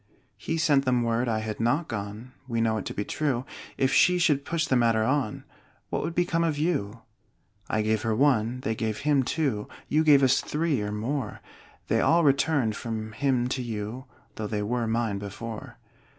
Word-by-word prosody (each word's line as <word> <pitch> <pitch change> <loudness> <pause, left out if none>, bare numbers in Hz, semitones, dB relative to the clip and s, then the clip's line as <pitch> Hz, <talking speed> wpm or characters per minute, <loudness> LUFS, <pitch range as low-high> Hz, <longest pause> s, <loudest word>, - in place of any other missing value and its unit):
He 160 +11 -3
sent 145 -4 +3
them 125 -2 +2
word 115 +1 0
I 110 -1 0
had 110 -1 -5
not 135 +9 +1
gone 105 +3 -6 0.2
(We 115 -2 -1
know 110 -1 +2
it - - -7
to - - -4
be 105 - -2
true); 135 -5 -1 0.3
If 130 0 +2
she 180 0 +5
should 150 -5 +2
push 165 -2 0
the 130 - +1
matter 115 -2 +3
on, 130 -2 0 0.5
What - - 0
would 165 +2 -3
become 175 -1 +1
of 160 -3 0
you? 125 - -1 0.7
I 110 - +1
gave 110 0 +1
her 110 -1 0
one, 125 -2 +2
they 110 - -1
gave 110 -1 -3
him 145 -2 +3
two, 130 -6 -1 0.2
You 155 +2 +3
gave 145 -3 +6
us 130 -1 +4
three 150 -5 -1
or 105 0 -3
more; 125 +7 -3 0.5
They - - +2
all 170 +1 +4
returned 135 -5 +2
from 110 -2 -4
him 130 0 +1
to 130 - -2
you, 115 +2 -5 0.3
Though 110 - -3
they 105 -1 -2
were 120 +2 -1
mine 110 -3 0
before. 105 +2 -7
120 Hz, 195 wpm, -27 LUFS, 110-145 Hz, 0.7 s, gave